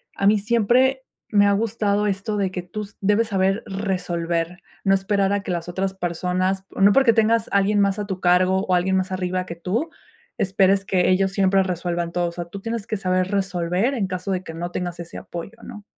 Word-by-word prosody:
A 195 - +1
mí 210 +1 +5
siempre 240 +5 +2 0.3
me 205 0 +5
ha 200 - +4
gustado 210 -1 0
esto 200 +2 -2
de 195 -2 0
que 180 -1 -4
tú 205 +3 -6
debes 210 +3 +2
saber 195 +1 +1
resolver, 175 -3 -2 0.2
no 195 - +4
esperar 195 0 +1
a 200 -1 -1
que - - -4
las 175 0 -3
otras 190 +2 -2
personas, 185 +1 -1
no 200 +1 +5
porque 265 -4 +5
tengas 225 0 +2
alguien 200 +1 +2
más 200 +1 +1
a 205 - -2
tu 190 -2 -4
cargo, 185 +2 +3
o 185 - +3
alguien 190 +2 +2
más 185 0 -1
arriba 185 0 -2
que 170 - -7
tú, 210 - -2 0.5
esperes 195 0 +2
que 185 -2 +2
ellos 190 +1 +2
siempre 195 -1 +3
resuelvan 175 -2 -2
todo. 175 -1 0
O - - -9
sea, 175 -1 -5
tú 195 +4 -9
tienes 230 -1 -4
que 215 - -2
saber 185 -1 0
resolver, 190 +4 0
en 200 -5 -1
caso 185 +1 -4
de 185 0 -1
que 160 - -8
no 175 +2 -5
tengas 175 -1 -4
ese 170 0 -8
apoyo, 175 +7 -8
¿no? 210 -1 -10
190 Hz, 210 wpm, -22 LUFS, 180-205 Hz, 0.5 s, mí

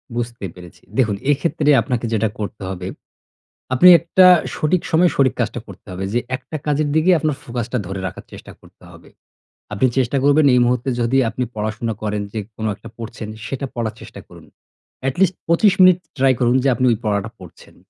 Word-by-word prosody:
বুঝতে 120 -3 -4
পেরেছি। 90 -1 -14 0.2
দেখুন 110 -6 +2 0.2
এক্ষেত্রে 150 +1 0
আপনাকে 125 -3 -2
যেটা 110 -1 +1
করতে 105 0 -6
হবে, 95 -1 -6 0.9
আপনি 175 +8 +6
একটা 175 +2 +4 0.3
সঠিক 165 +3 0
সময়ে 170 +2 +4
সঠিক 130 -2 +3
কাজটা 120 0 -2
করতে 100 +1 -14
হবে। 90 +1 -5
যে 120 - +2 0.2
একটা 155 - -9
কাজের 150 0 0
দিকে 160 +3 +3
আপনার 155 -2 -1
ফোকাসটা 120 +1 -4
ধরে 95 0 -5
রাখার - - -9
চেষ্টা - - -11
করতে - - -21
হবে। - - -16 0.6
আপনি 130 +6 +2
চেষ্টা 130 +1 +1
করবেন 145 +1 +4
এই 125 - +5
মুহূর্তে 125 +2 0
যদি 120 +3 +1
আপনি 125 +2 -3
পড়াশোনা 110 +1 -3
করেন 105 -1 -2
যে 110 - -3 0.2
কোনো 110 0 -3
একটা 115 - -13
পড়ছেন 115 -1 -7 0.2
সেটা 135 +2 -4
পড়ার 115 -2 -2
চেষ্টা - - -11
করুন। - - -15 0.6
অ্যাট 135 0 -2
লিস্ট 185 -1 +3
২৫ 180 +4 +4
মিনিট 185 -1 +7 0.2
ট্রাই 135 0 +4
করুন 120 +1 +2
যে 140 - +2
আপনি 130 - 0
ওই 115 - +1
পড়াটা 105 0 -1
পড়ছেন। 90 -3 -15
120 Hz, 185 wpm, -19 LUFS, 110-145 Hz, 0.9 s, মিনিট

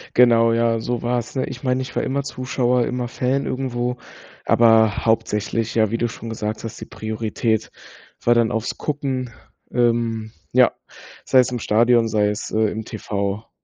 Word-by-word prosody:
Genau, 115 -2 +5
ja, 115 0 +2
so 120 0 -2
war's, 120 +1 -2
ne? 130 - 0
Ich 125 - -8
meine, 130 0 +1
ich 130 0 -7
war - - 0
immer 140 +1 -1
Zuschauer, 125 -2 0
immer 125 -1 -2
Fan 130 +2 -1
irgendwo, 125 -1 -2 0.5
aber 110 -2 +4
hauptsächlich, 110 0 0
ja, 110 -2 +3
wie 115 - -1
du 120 0 0
schon 115 - -9
gesagt 110 0 -4
hast, 115 0 -7
die - - -5
Priorität 110 0 -2 0.5
war 120 - +5
dann 115 -2 +3
aufs 110 +1 -2
Gucken, 135 -4 -3 0.4
ähm, 115 -2 0 0.2
ja, - - +5 0.5
sei 130 - +4
es 125 0 +3
im 125 - -2
Stadion, 115 +2 +3
sei 105 -1 +2
es, 105 - -4
äh, 110 - 0
im 110 - -4
TV. 100 -1 -4
115 Hz, 170 wpm, -21 LUFS, 110-125 Hz, 0.5 s, Genau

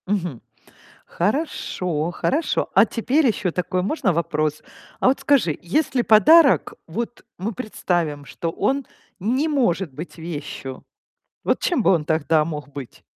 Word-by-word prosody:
Мгм. 180 - -2 0.6
Хорошо 180 - -2
хорошо. 295 - 0
А 195 - +7
теперь 250 +7 +1
ещё 205 -5 0
такой 180 +1 -1
можно 195 - 0
вопрос? 155 -2 -1 0.4
А - - +3
вот 260 - +3
скажи, 250 - +2
если 255 - +1
подарок, 270 - +6
вот 235 +8 -5
мы 210 +6 -3
представим, 175 - -2
что 165 - -4
он 270 +9 0 0.3
не 250 - 0
может 195 - 0
быть 160 +7 -8
вещью, 150 -5 -6 0.6
вот - - +1
чем 345 -10 +1
бы - - +4
он 170 -5 +2
тогда 160 0 +2
мог 150 -3 -5
быть? 140 -3 -9
180 Hz, 135 wpm, -22 LUFS, 160-245 Hz, 0.6 s, А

